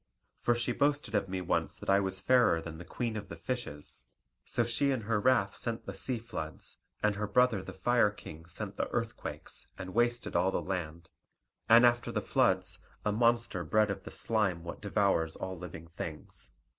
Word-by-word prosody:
For 120 Hz, -, +2 dB
she 120 Hz, +1 st, 0 dB
boasted 145 Hz, +3 st, +1 dB
of 95 Hz, -, +1 dB
me 95 Hz, 0 st, -2 dB
once 90 Hz, -, 0 dB
that -, -, -10 dB
I 100 Hz, 0 st, +5 dB
was 95 Hz, -1 st, -1 dB
fairer 120 Hz, -5 st, +4 dB
than 80 Hz, -1 st, -7 dB
the -, -, -7 dB
Queen 115 Hz, +4 st, -3 dB
of 105 Hz, -1 st, -5 dB
the 85 Hz, -, -6 dB
Fishes; 80 Hz, -, -5 dB, 0.4 s
so 120 Hz, -, +1 dB
she 120 Hz, +5 st, +1 dB
in 130 Hz, -4 st, +1 dB
her 105 Hz, 0 st, 0 dB
wrath 120 Hz, -4 st, +3 dB
sent 115 Hz, -1 st, -4 dB
the -, -, -5 dB
sea 130 Hz, -2 st, -2 dB
floods, 95 Hz, -9 st, -7 dB, 0.3 s
and 105 Hz, -1 st, +4 dB
her 105 Hz, 0 st, -1 dB
brother 115 Hz, -1 st, +3 dB
the -, -, -8 dB
Fire 120 Hz, +3 st, +3 dB
King 80 Hz, -5 st, -10 dB
sent 85 Hz, -, -6 dB
the -, -, 0 dB
earthquakes, -, -, -4 dB
and 95 Hz, -1 st, -6 dB
wasted 120 Hz, +1 st, +1 dB
all 90 Hz, +2 st, +4 dB
the -, -, 0 dB
land, 85 Hz, -3 st, -4 dB, 0.6 s
and 115 Hz, +2 st, +9 dB
after 120 Hz, 0 st, +3 dB
the -, -, 0 dB
floods -, -, +1 dB, 0.3 s
a 105 Hz, -, +3 dB
monster 115 Hz, -4 st, +2 dB
bred 105 Hz, +5 st, +3 dB
of 100 Hz, -, -5 dB
the -, -, -7 dB
slime 100 Hz, -7 st, 0 dB
what 85 Hz, -, -7 dB
devours 100 Hz, -6 st, +1 dB
all 95 Hz, 0 st, -4 dB
living 85 Hz, -2 st, -8 dB
things. 75 Hz, -6 st, -6 dB
105 Hz, 195 wpm, -32 LUFS, 90-120 Hz, 0.6 s, and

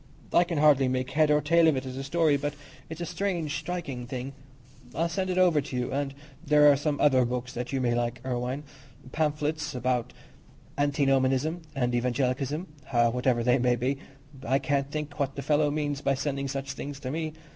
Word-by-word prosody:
I 175 Hz, -, +5 dB
can 170 Hz, -2 st, -3 dB
hardly 145 Hz, -3 st, +5 dB
make 130 Hz, +1 st, -1 dB
head 155 Hz, +1 st, +3 dB
or 150 Hz, 0 st, +4 dB
tail 165 Hz, +2 st, +4 dB
of 155 Hz, -, +4 dB
it 130 Hz, 0 st, -3 dB
as 130 Hz, -1 st, -6 dB
a 135 Hz, -, -4 dB
story, 155 Hz, +1 st, +2 dB
but 145 Hz, +1 st, -2 dB, 0.3 s
it's 160 Hz, +1 st, -7 dB
a -, -, -1 dB
strange, 170 Hz, -4 st, -2 dB
striking 140 Hz, -9 st, -5 dB
thing. 130 Hz, +1 st, -5 dB, 0.6 s
I'll 165 Hz, +3 st, +1 dB
send 185 Hz, +2 st, -2 dB
it 180 Hz, -, -1 dB
over 175 Hz, -5 st, +4 dB
to 135 Hz, -1 st, -7 dB
you; 125 Hz, 0 st, -2 dB
and 140 Hz, 0 st, -2 dB, 0.3 s
there 150 Hz, -2 st, +6 dB
are -, -, +4 dB
some 145 Hz, +1 st, -1 dB
other 130 Hz, -3 st, +5 dB
books 125 Hz, +1 st, -3 dB
that 125 Hz, +1 st, -4 dB
you 135 Hz, -, 0 dB
may 120 Hz, -2 st, +1 dB
like 120 Hz, 0 st, 0 dB
to -, -, -17 dB
see, 130 Hz, -, -5 dB
Irwine—pamphlets 145 Hz, +3 st, -3 dB
about 125 Hz, -1 st, -1 dB, 0.6 s
Antinomianism 140 Hz, +2 st, +1 dB
and 125 Hz, -2 st, 0 dB
Evangelicalism, 130 Hz, +5 st, 0 dB, 0.5 s
whatever 125 Hz, -1 st, +1 dB
they 125 Hz, +2 st, +3 dB
may 125 Hz, 0 st, +3 dB
be. 130 Hz, +3 st, -1 dB, 0.4 s
I 135 Hz, 0 st, +2 dB
can't 140 Hz, 0 st, 0 dB
think 150 Hz, 0 st, -5 dB
what 140 Hz, -1 st, -1 dB
the 140 Hz, -, -5 dB
fellow 150 Hz, +1 st, +2 dB
means 145 Hz, -1 st, -2 dB
by 140 Hz, -1 st, +1 dB
sending 140 Hz, 0 st, -2 dB
such 135 Hz, 0 st, -4 dB
things 140 Hz, 0 st, -6 dB
to 130 Hz, -, -4 dB
me. 155 Hz, 0 st, -3 dB
140 Hz, 200 wpm, -27 LUFS, 130-150 Hz, 0.6 s, there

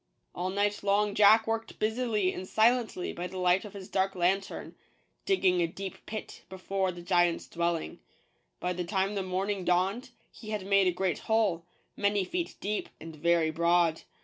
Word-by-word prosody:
All 180 Hz, +1 st, -2 dB
night 205 Hz, +2 st, 0 dB
long 205 Hz, +1 st, +2 dB
Jack 215 Hz, +2 st, +6 dB
worked 225 Hz, 0 st, -3 dB
busily 215 Hz, -3 st, 0 dB
and 185 Hz, -, -6 dB
silently 225 Hz, -4 st, +1 dB
by 175 Hz, +1 st, -4 dB
the 190 Hz, -, -8 dB
light 180 Hz, +1 st, +3 dB
of 205 Hz, -, -10 dB
his 190 Hz, -2 st, -8 dB
dark 195 Hz, 0 st, 0 dB
lantern, 190 Hz, +2 st, -1 dB, 0.5 s
digging 185 Hz, -, +3 dB
a 170 Hz, -, +2 dB
deep 190 Hz, +3 st, -8 dB
pit 215 Hz, 0 st, -7 dB
be 190 Hz, -, -8 dB
fore 190 Hz, 0 st, -1 dB
the 175 Hz, -1 st, -10 dB
giant's 175 Hz, -1 st, +2 dB
dwelling. 170 Hz, -1 st, -2 dB, 0.6 s
By 180 Hz, -, -1 dB
the 180 Hz, 0 st, -3 dB
time 190 Hz, +3 st, 0 dB
the 200 Hz, -, -1 dB
morning 190 Hz, +1 st, -2 dB
dawned, 190 Hz, +9 st, +1 dB, 0.2 s
he 215 Hz, -, -11 dB
had 210 Hz, -3 st, -3 dB
made 200 Hz, -1 st, +4 dB
a -, -, +4 dB
great 180 Hz, -3 st, -1 dB
hole, 205 Hz, -7 st, +1 dB, 0.3 s
many 200 Hz, -1 st, +1 dB
feet 345 Hz, -, -3 dB
deep, 210 Hz, +1 st, -3 dB
and 160 Hz, 0 st, -9 dB
very 165 Hz, 0 st, +2 dB
broad. 170 Hz, 0 st, +2 dB
190 Hz, 175 wpm, -29 LUFS, 175-210 Hz, 0.6 s, Jack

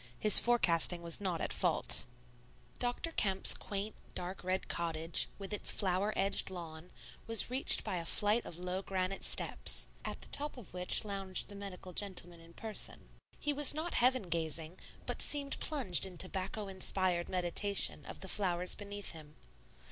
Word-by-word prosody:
His 215 Hz, -, +10 dB
forecasting 175 Hz, -7 st, +1 dB
was 170 Hz, +3 st, -3 dB
not 180 Hz, -4 st, -3 dB
at -, -, -2 dB
fault. -, -, 0 dB, 0.7 s
Dr. 245 Hz, +7 st, -1 dB
Kemp's 195 Hz, -10 st, +7 dB
quaint, 205 Hz, +1 st, -5 dB, 0.2 s
dark 180 Hz, +1 st, -6 dB
red 185 Hz, +1 st, -2 dB
cottage, 165 Hz, -1 st, -2 dB
with 200 Hz, +1 st, -8 dB
its 205 Hz, -, +3 dB
flower 190 Hz, +2 st, 0 dB
edged 195 Hz, 0 st, 0 dB
lawn, 170 Hz, -2 st, -9 dB, 0.4 s
was 225 Hz, +1 st, +3 dB
reached 260 Hz, +2 st, +4 dB
by 185 Hz, -, -3 dB
a 170 Hz, -, -5 dB
flight 210 Hz, +6 st, +1 dB
of 165 Hz, -, -9 dB
low 180 Hz, +1 st, -4 dB
granite 190 Hz, 0 st, -3 dB
steps, -, -, +3 dB
at -, -, -7 dB
the -, -, -8 dB
top 295 Hz, -1 st, -4 dB
of 225 Hz, -9 st, -13 dB
which 180 Hz, +3 st, 0 dB
lounged 195 Hz, -2 st, -4 dB
the 205 Hz, -, -9 dB
medical 190 Hz, -2 st, -9 dB
gentleman 180 Hz, -4 st, -3 dB
in 165 Hz, 0 st, -17 dB
person. 220 Hz, +2 st, -4 dB, 0.3 s
He 295 Hz, -, -2 dB
was 290 Hz, 0 st, +3 dB
not 325 Hz, +3 st, -4 dB
heaven 255 Hz, 0 st, +2 dB
gazing, 165 Hz, 0 st, -3 dB, 0.3 s
but -, -, -2 dB
seemed 280 Hz, -1 st, +1 dB
plunged 205 Hz, -, +3 dB
in 180 Hz, -2 st, -12 dB
tobacco 190 Hz, +3 st, -3 dB
inspired 185 Hz, -2 st, -1 dB
meditation 185 Hz, +2 st, +1 dB
of -, -, -10 dB
the 190 Hz, -, -8 dB
flowers 180 Hz, -2 st, 0 dB
beneath 205 Hz, 0 st, -6 dB
him. 155 Hz, -2 st, -13 dB
190 Hz, 165 wpm, -33 LUFS, 175-210 Hz, 0.7 s, His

